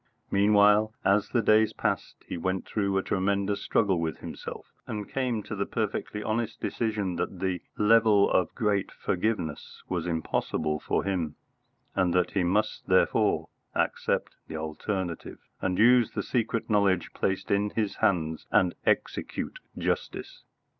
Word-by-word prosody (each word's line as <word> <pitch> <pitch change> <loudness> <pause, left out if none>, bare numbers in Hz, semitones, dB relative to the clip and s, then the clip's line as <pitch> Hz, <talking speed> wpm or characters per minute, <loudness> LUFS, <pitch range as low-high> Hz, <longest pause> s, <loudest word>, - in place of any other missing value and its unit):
Meanwhile, 105 +2 +4
as 100 +1 +3
the 120 -3 +1
days 110 0 +4
passed, - - -3
he - - -4
went 95 +2 -2
through 100 -2 0
a 95 - +1
tremendous 100 +1 0
struggle 95 -5 +2
with 80 -2 -2
himself, - - -8 0.2
and 105 -1 -4
came 125 -5 -1
to 110 - -5
the 100 0 -2
perfectly 105 -1 -2
honest 115 0 -2
decision 105 -6 -2
that 95 - -3
the 95 -2 -1 0.2
"level 105 -1 +5
of 90 -3 +3
a - - -37
great 100 -3 0
forgiveness" 90 -5 -3
was - - -2
impossible 80 -2 -1
for - - -1
him, 90 -6 -2 0.6
and 90 -2 +1
that 90 0 +2
he 95 - +1
must 105 +5 0
therefore - - +2 0.3
accept - - 0
the 80 - -5
alternative 85 +3 -4 0.2
and 90 -1 0
use 120 +1 +6
the - - -2
secret 115 -2 -1
knowledge 100 -5 +2
placed 95 0 -1
in 100 +1 +2
his 105 -1 -2
hands 80 -4 0
and 95 -5 +4
execute - - -1 0.2
justice. - - -3
100 Hz, 145 wpm, -28 LUFS, 90-110 Hz, 0.6 s, use